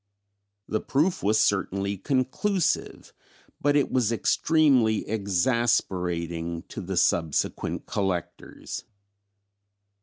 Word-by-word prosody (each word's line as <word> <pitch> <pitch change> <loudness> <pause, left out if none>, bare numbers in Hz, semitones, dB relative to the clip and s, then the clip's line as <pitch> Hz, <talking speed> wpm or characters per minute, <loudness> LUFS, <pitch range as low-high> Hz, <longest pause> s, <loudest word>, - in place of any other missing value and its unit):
The 110 - -1
proof 160 +7 0
was 105 +2 +2
certainly 100 -1 0
conclusive, 140 - -1 0.5
but 145 0 +2
it 145 - +2
was 120 -4 +1
extremely 130 -3 +2
exasperating 90 -6 0
to - - -6
the 95 0 -4
subsequent 80 -3 0
collectors. 95 -4 -4
105 Hz, 85 wpm, -26 LUFS, 90-130 Hz, 0.5 s, was